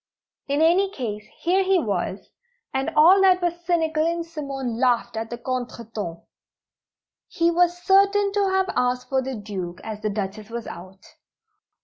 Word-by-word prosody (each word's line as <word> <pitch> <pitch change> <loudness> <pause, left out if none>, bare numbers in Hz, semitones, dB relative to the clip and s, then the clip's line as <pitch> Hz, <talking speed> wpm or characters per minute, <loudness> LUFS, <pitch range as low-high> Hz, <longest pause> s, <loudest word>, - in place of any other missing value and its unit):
In 285 +2 +1
any 365 +4 +4
case, 215 - -5
here 370 +3 +2
he 380 0 +3
was, 200 - -3 0.4
and 265 0 0
all 355 +6 +7
that 370 -1 +5
was 345 -1 -2
cynical 320 -3 +1
in 335 +1 0
Simone 275 -7 -5
laughed 245 -3 +1
at 225 0 -4
the 240 - -5
contretemps. 230 -7 -5 1.0
He 335 0 +1
was 350 +1 +2
certain 400 +1 +4
to 405 -1 +2
have 380 0 +1
asked 250 0 0
for 265 -1 +1
the 260 0 -4
Duke, 190 -5 -6
as 215 -1 -6
the 215 - -1
Duchess 205 +1 -4
was 235 0 -5
out. 185 +2 -10
265 Hz, 155 wpm, -24 LUFS, 220-345 Hz, 1.0 s, all